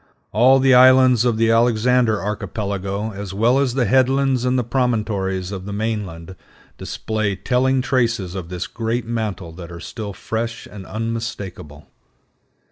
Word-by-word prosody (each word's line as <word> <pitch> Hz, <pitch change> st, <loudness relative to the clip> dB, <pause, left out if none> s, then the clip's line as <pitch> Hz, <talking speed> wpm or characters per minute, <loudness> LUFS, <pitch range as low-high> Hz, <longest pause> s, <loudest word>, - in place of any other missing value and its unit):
All 125 Hz, +6 st, +5 dB
the 135 Hz, 0 st, +4 dB
islands 130 Hz, -1 st, +6 dB
of 120 Hz, -3 st, +1 dB
the 115 Hz, 0 st, +3 dB
Alexander 115 Hz, 0 st, +3 dB
Archipelago, 100 Hz, 0 st, -3 dB
as 100 Hz, -1 st, -7 dB
well 120 Hz, +6 st, +3 dB
as 130 Hz, -3 st, 0 dB
the 130 Hz, -3 st, +2 dB
headlands 130 Hz, +1 st, +2 dB
and 125 Hz, +1 st, +1 dB
promontories 105 Hz, -7 st, -1 dB
of 95 Hz, -2 st, -6 dB
the 100 Hz, -, -5 dB
mainland, 100 Hz, -5 st, -4 dB, 0.4 s
display 110 Hz, -2 st, -2 dB
telling 130 Hz, +5 st, +1 dB
traces 115 Hz, -8 st, 0 dB
of 90 Hz, -3 st, -6 dB
this 90 Hz, -1 st, -4 dB
great 115 Hz, +3 st, -3 dB
mantle 110 Hz, -7 st, -4 dB
that 85 Hz, +1 st, -10 dB
are 85 Hz, -, -8 dB
still 105 Hz, +4 st, -6 dB
fresh 115 Hz, +3 st, -4 dB
and 100 Hz, -2 st, -11 dB
unmistakable. 110 Hz, -10 st, -5 dB
110 Hz, 140 wpm, -20 LUFS, 100-125 Hz, 0.4 s, islands